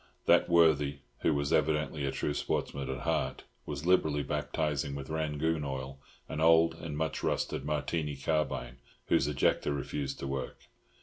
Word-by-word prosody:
That - - +5
worthy, 75 -4 +4 0.2
who 80 - +2
was 70 +2 0
evidently 75 -1 +1
a 70 - 0
true 75 - -1
sportsman 70 -1 -2
at 65 - -3
heart, - - -1 0.2
was 75 +1 -4
liberally 80 -5 +3
baptising 70 -3 -1
with 70 +1 -6
Rangoon 80 0 0
oil 70 0 -5 0.3
an 75 - -4
old 80 0 +6
and 80 -2 -6
much 80 0 -2
rusted 70 - -1
Martini 75 0 -1
carbine, 70 -4 -1 0.3
whose 70 - +3
ejector 75 0 +1
refused 70 -1 -3
to - - -5
work. 70 -1 -4
75 Hz, 150 wpm, -31 LUFS, 70-80 Hz, 0.3 s, old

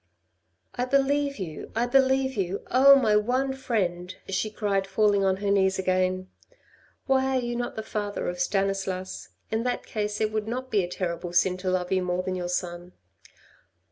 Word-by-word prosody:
" - - -50 0.3
I 250 - -1
believe 275 +1 +1
you! 170 -6 -7
I 235 +2 +2
believe 265 +1 +2
you! 195 -1 -2
Oh, 275 +2 +8
my 225 -6 +3
one 255 +5 +1
friend," 185 -9 -2
she 195 +3 -1
cried 200 -2 -1
falling 205 -1 +2
on 190 -1 +2
her 200 - +2
knees 190 -1 +3
again. 185 0 0 0.4
" - - -32
Why 265 -1 +2
are - - +3
you 240 -1 -3
not 240 0 -3
the 220 - -4
father 205 -1 -3
of 175 0 -3
Stanislas? 190 -1 -2 0.2
In 220 +1 0
that 245 +1 -2
case 210 -1 -3
it 215 -1 +1
would 215 0 -2
not 255 +3 -4
be 205 -3 +3
a - - -3
terrible 175 -1 -4
sin 180 +1 +3
to 185 0 -3
love 180 -1 -1
you 190 -1 +2
more 180 0 -1
than 185 - -2
your 180 -1 -3
son." 175 0 -4
200 Hz, 190 wpm, -26 LUFS, 185-245 Hz, 0.4 s, Oh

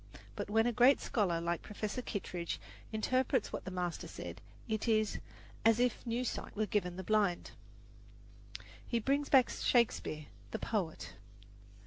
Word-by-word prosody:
But - - -4
when 225 +2 +4
a 240 - +3
great 250 +4 +6
scholar 185 -7 +1
like 170 0 -1
Professor 215 +3 -4
Kittredge 180 -7 -4 0.3
interprets 255 +3 +1
what - - -4
the - - -3
master 180 -2 -3
said, - - -7 0.3
it 220 0 -1
is 215 -2 +2 0.4
"as 225 +1 +5
if 245 -2 +1
new 235 +2 0
sight - - -4
were 215 +1 +1
given 180 -4 0
the 190 - -4
blind." 205 -3 +1 1.4
He 235 - +1
brings 275 +5 +1
back 260 -3 +6
Shakespeare, 220 - +1 0.2
the - - -3
poet. 165 - -2
215 Hz, 145 wpm, -34 LUFS, 185-240 Hz, 1.4 s, great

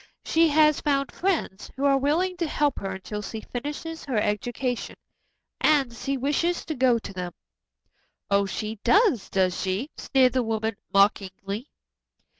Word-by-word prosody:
She 330 +1 +4
has 305 0 +4
found 275 -2 0
friends 335 - -2
who 270 +2 -1
are 275 -1 +5
willing 335 +7 +1
to 340 -2 -1
help 295 -2 0
her 195 - -4
until 210 +2 -6
she 220 +2 -6
finishes 295 +7 -6
her 260 -6 -2
education, 240 +4 -2 0.6
and 280 -6 +3
she 275 +4 -3
wishes 295 +6 0
to 315 - -3
go 255 -3 +3
to 210 -3 -8
them." 180 -2 -5 1.0
"Oh, 200 0 +3
she 215 +2 -4
does, 400 - +3
does 185 -2 +1
she?" 195 +10 -2
sneered 260 -2 +3
the 260 - +2
woman 220 -1 -1 0.2
mockingly. 195 +3 +1
255 Hz, 150 wpm, -25 LUFS, 210-295 Hz, 1.0 s, are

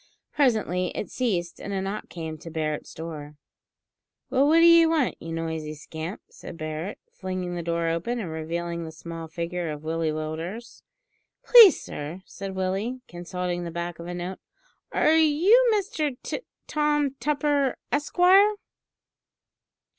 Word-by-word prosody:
Presently 215 -10 +2
it - - -4
ceased, 180 -9 -1
and 200 - -6
a 195 - -1
knock 195 +2 -4
came 160 -2 -6
to 165 - -9
Barret's 155 -2 -3
door. 155 -2 -7 1.0
"Well, 270 +2 +4
what 325 +2 +5
d'ye 335 -1 +8
want, 320 -6 +2
you 165 - -7
noisy 160 -2 -3
scamp?" 160 +5 -7
said - - -10
Barret, 155 +5 -4 0.2
flinging 185 -1 -4
the 175 - -3
door 170 0 -1
open, 170 +9 -1
and 180 -8 -4
revealing 170 +2 -3
the 160 - -7
small 165 0 -8
figure 170 +1 -3
of 150 0 -6
Willie 160 0 -1
Willders. 160 +9 -5 0.6
"Please, 455 -8 +9
sir," 160 +6 -7
said 195 -1 -7
Willie, 195 +7 -2
consulting 175 0 -4
the 170 - -4
back 170 0 -5
of 170 - -7
a 175 - -4
note; 180 +2 -5 0.5
"are 310 - +3
you 335 +11 +5
Mister 380 - 0
T - - -3 0.3
Tom 295 -2 +1
Tupper, 290 -2 +1
Esquire?" 365 +8 +5
180 Hz, 145 wpm, -26 LUFS, -, 1.0 s, Please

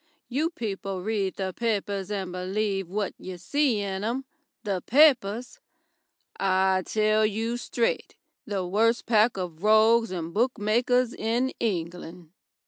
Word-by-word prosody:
You 295 +6 0
people 195 - -5
read 200 -3 -1
the 190 -1 -3
papers 205 -4 -2
and 195 -3 -3
believe 195 +1 -2
what 200 0 -2
you 185 -1 -7
see 245 - +1
in 195 -1 -3
'em. 245 +5 -2 0.4
The 195 -4 -2
papers! 250 - +3 0.8
I 190 0 +2
tell 215 0 +2
you 220 +2 0
stryte 240 -1 -2 0.3
the 195 -3 -2
worst 225 +6 +1
pack 220 -1 +3
of 175 -3 -5
rogues 220 +2 +5
and 170 -2 -5
bookmakers 240 +2 +1
in 235 +4 0
England." 175 -4 -4
210 Hz, 130 wpm, -26 LUFS, 190-230 Hz, 0.8 s, rogues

